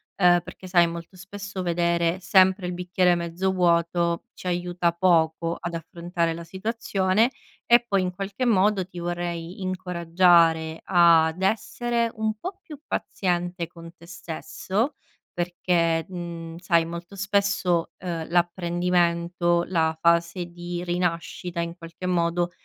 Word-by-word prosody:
ehm, 175 -2 +5
perché 185 +2 -11
sai, 175 -2 +4
molto 170 +2 -8
spesso 200 +1 -7
vedere 170 0 +1
sempre 185 0 +4
il 180 - -3
bicchiere 180 0 +2
mezzo 170 +2 -1
vuoto 170 -1 +1
ci 185 - -9
aiuta 175 -1 0
poco 170 -2 +2
ad 175 - -5
affrontare 170 0 -2
la 170 +1 -7
situazione. 200 +3 0 0.3
E 240 0 +6
poi, 200 -4 +1
in 180 0 -2
qualche 200 +6 -3
modo, 200 -3 +3
ti 180 -2 -9
vorrei 175 +1 -4
incoraggiare 170 -3 +2
ad 170 -1 +4
essere 235 +3 0
un 220 -1 -1
po' 370 - -6
più 300 -3 -11
paziente 175 -2 -2
con 170 -1 -12
te 170 - -15
stesso 190 - -3 0.4
perché, 170 -2 0
mhmm, 170 -2 -7
sai, 170 -2 +2
molto 170 +3 -8
spesso, 195 -4 +1
ehm, 170 -3 -4
l'apprendimento, 175 0 +1
la 160 -3 +1
fase 170 +1 +2
di 175 0 -6
rinascita, 175 0 -2
in 170 0 -4
qualche 170 +2 -9
modo, 175 0 +1
175 Hz, 130 wpm, -25 LUFS, 170-185 Hz, 0.4 s, E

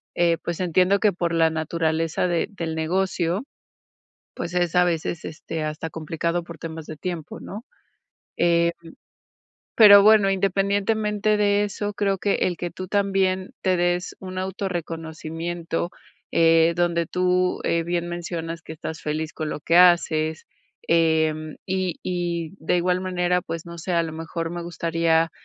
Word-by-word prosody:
eh, 170 -1 +3
pues, 170 -1 -3
entiendo 185 +3 +3
que 210 -1 +3
por 170 -1 -1
la 165 -1 +4
naturaleza 160 +1 -1
de 175 -2 0
del 165 -5 -4
negocio, 175 +3 0 0.9
pues, 170 - -5
es 175 -1 0
a 180 - +6
veces, 165 -1 -2
este, 160 0 -5
hasta 155 +1 -4
complicado 165 +2 -2
por 170 -2 -11
temas 160 -1 -7
de 155 - -6
tiempo, 170 -2 -5
¿no?, 210 +6 -8 0.7
em, 170 0 +3 1.1
pero 205 -2 +9
bueno, 210 -1 +6
independientemente 205 +2 +1
de 205 0 +3
eso, 205 0 -3
creo 200 -1 +1
que 200 +2 +1
el 180 - -1
que 175 0 -4
tú 185 +1 -7
también 195 -2 +1
te 185 -1 +2
des 175 +1 0
un 185 -1 -6
autorreconocimiento, 170 -2 -4 0.4
eh, 165 0 +5
donde 170 -1 +1
tú, 180 +1 +1
eh, 170 - +1
bien 175 0 -2
mencionas 170 -1 -5
que - - -9
estás 160 0 -7
feliz 155 +1 -3
con 155 -1 -3
lo - - -5
que 165 +3 +2
haces, 160 -3 +4 0.4
em, 160 -2 +2
y 185 -2 -1
y 175 -2 -3
de 160 - 0
igual 180 +1 +1
manera, 180 -1 0
pues 165 0 -6
no 170 0 -9
sé, 180 +3 -4
a 170 -1 +3
lo 165 -1 -5
mejor, 165 +1 -4
me 175 0 -5
gustaría, 165 -1 +1
175 Hz, 155 wpm, -24 LUFS, 165-185 Hz, 1.1 s, pero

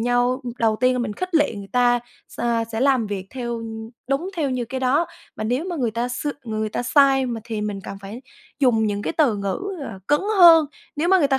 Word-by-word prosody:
nhau 245 +2 +1 0.2
đầu 220 -2 +2
tiên 255 0 +4
là 250 - -1
mình 240 -4 -2
khích 370 - -5
lệ 295 -6 +3
người 200 -1 -8
ta, 245 -1 +4 0.3
s - - -10 0.3
sẽ 225 - -2
làm 260 -4 +3
việc 200 -2 -4
theo 235 -3 -4 0.5
đúng 275 +7 0
theo 295 -5 0
như 250 -2 -1
cái 260 +3 -5
đó. 275 +6 +2 0.3
Mà 215 - -4
nếu 250 +8 0
mà 360 -2 -4
người 245 -6 0
ta 235 +2 -2
s 250 +4 -4 0.2
người 215 -1 -2
ta 215 - -3
sai, 270 0 +4
mình 230 -3 -4
thì 220 -2 -3
mình 210 -2 -3
cần 195 - -7
phải 205 +6 -9 0.4
dùng 245 -6 +3
những 205 -1 -2
cái - - -2
từ 280 -10 +2
ngữ, 200 -1 -2 0.2
ờ, 225 -8 -6
cứng 295 +3 +3 0.2
hơn. 330 -3 +8 0.3
Nếu 320 +4 0
mà 380 0 +6
người 290 -5 +3
ta 270 -1 +2
245 Hz, 235 wpm, -22 LUFS, 220-280 Hz, 0.5 s, hơn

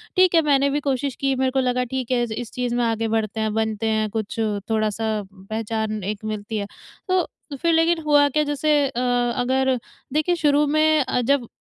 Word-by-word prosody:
ठीक 370 -2 +4
है 325 - +6
मैंने 280 -2 +3
भी 290 +1 0
क़ोशिश 275 -1 -1
की 275 -1 +1
मेरे 260 0 +1
को 265 - +1
लगा 250 -1 +1
ठीक 260 -1 -2
है 245 - +2
इस 235 0 -5
चीज़ 245 -1 -2
में 245 - +1
आगे 225 0 0
बढ़ते 220 -1 -1
हैं 220 -1 0
बनते 220 0 -1
हैं 215 -1 0
कुछ 215 +1 -4 0.3
थोड़ा-सा 215 0 0
पहचान 215 +1 -3
एक 210 +2 -4
मिलती 215 0 -4
है। 200 - -2 0.4
तो 370 -1 +2 0.3
फ़िर 335 +4 +1
लेकिन 330 +1 +3
हुआ 290 -1 +5
क्या 300 +2 +1
जैसे 295 +1 0
अ, 255 -2 -3 0.4
अगर 260 +1 +1 0.4
देखिए 310 +4 +2
शुरू 295 -2 +3
में 310 +1 +3
अ, 250 - 0
जब 250 0 +1
250 Hz, 195 wpm, -22 LUFS, 220-290 Hz, 0.4 s, है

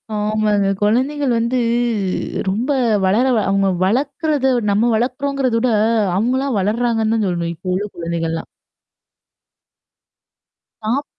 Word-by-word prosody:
ஆமாங்க. 210 -1 +1
குழந்தைகள் 260 +6 +1
வந்து 235 +2 0 0.9
ரொம்ப 225 +8 -2 0.4
வளர 210 +7 +3
வ - - +2
அவங்க 195 0 +2 0.2
வளக்றத 275 - 0 0.2
நம்ம 225 +4 +2
வளக்கறோங்கிறத 255 +2 -1
விட 250 +2 +1 0.5
அவங்கலாம் 255 +4 0
வளர்றாங்கன்னு 225 +2 0
தான் 220 -2 0
சொல்லணும். 170 -2 -2
இப்போ 185 +3 -5
உள்ள 200 +3 -2
குழந்தைகள்லாம். 165 -1 -3 2.4
டாப் 245 +7 -1
225 Hz, 100 wpm, -19 LUFS, 195-255 Hz, 2.4 s, வளர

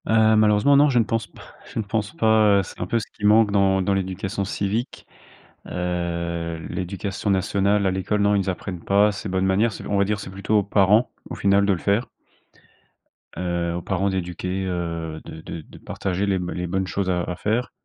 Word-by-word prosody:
Heu, 110 0 +4
malheureusement, 110 +6 +4
non, 145 +1 +6
je 125 - +1
ne - - +4
pense 110 -1 -2
p - - -19 0.3
je - - -8
ne - - 0
pense 105 0 -2
pas, 110 -2 +4
heu, - - 0
c'est - - -11
un 90 - -2
peu 115 - +1
ce 110 - -2
qui 105 - -14
manque 105 0 +5
dans 95 -1 +3
dans 100 - +1
l'éducation 95 +1 -2
civique. 105 +6 -3 0.6
Heu, 85 -2 -3
l'Éducation 100 +2 -4
Nationale, 100 +1 +1
à 95 - +2
l'école, 95 +3 -1
non, 100 0 +3
ils 95 -1 0
apprennent 90 0 -5
pas 100 +2 +4
ces 105 +1 -6
bonnes 95 0 0
manières. 100 +5 +2 0.2
On 100 - +1
va 100 - +3
dire, 105 0 -1
c'est - - -7
plutôt 100 +3 +1
aux - - 0
parents, 105 +3 +3 0.2
au - - -5
final, 100 0 +3
de 100 - +3
le 90 - -3
faire 100 +7 +1 1.3
heu, 85 -1 -1
aux 85 - -3
parents 95 +2 0
d'éduquer, 95 +1 -3
heu, 85 -3 -4
de 80 - -9
de 80 - -7
de - - -15
partager 95 +1 -3
les 100 -1 +1
b 90 0 -4
les 90 0 -3
bonnes 95 +1 -1
choses 95 0 -2
à 90 -1 +1
à 90 - -4
faire. 115 +4 -1
100 Hz, 210 wpm, -23 LUFS, 90-105 Hz, 1.3 s, non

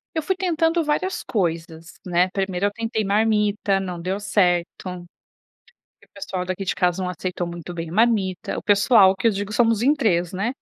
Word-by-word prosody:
Eu 320 - -1
fui 380 - 0
tentando 335 -2 +1
várias 305 +6 -1
coisas, 165 -4 -3
né? 180 +1 +2
Primeiro, 195 -1 -1
eu - - -3
tentei 225 0 -2
marmita. 210 -1 +1
Não 180 -3 -5
deu 190 +3 -2
certo, 180 -4 +2 0.2
porque 180 -2 -9 0.8
o - - -37
pessoal 190 -2 -5
daqui 185 +1 -4
de - - -1
casa 180 +1 +1
não 180 - -2
aceitou 180 0 -4
muito 170 0 -7
bem 165 -1 -5
a - - -8
marmita. 205 -5 +1
O - - -4
pessoal, 200 -1 +5
que 230 - +1
eu - - +4
digo, 205 +1 -4
somos 230 -2 +2
em 280 +4 +4
3, 180 - 0
né? 215 +7 -2
195 Hz, 190 wpm, -22 LUFS, 180-225 Hz, 0.8 s, pessoal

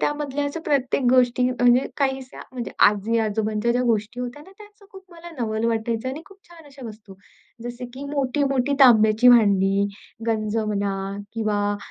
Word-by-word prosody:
त्या - - +1
मजल्याच्या 290 +2 -4
प्रत्येक 275 -3 0
गोष्टी 250 -1 +3
म्हणजे 245 +1 +3
काहीशा 265 -2 -3
म्हणजे 245 -3 -5 0.2
आजी-आजोबांच्या 215 +1 -1
ज्या 245 +1 0
गोष्टी 230 +1 -1
होत्या 250 +4 -6
ना, 380 - -17
त्याचं 415 -1 -17
खूप 385 - -12
मला 340 0 -11
नवल 220 -1 -2
वाटायचं 230 +1 -2
आणि 300 +4 -7
खूप 395 0 -17
छान 340 -2 -16
अशा 275 -3 -11
वस्तू. 215 -3 -12 0.5
जसे 240 +1 -6
की 270 +2 -8
मोठी-मोठी 275 -1 0
तांब्याची 225 -2 +6
भांडी, 200 -4 +4 0.4
गंजं 215 -1 -1
म्हणा 200 -2 -2 0.4
किंवा 205 -2 -1
245 Hz, 150 wpm, -23 LUFS, 215-275 Hz, 0.5 s, तांब्याची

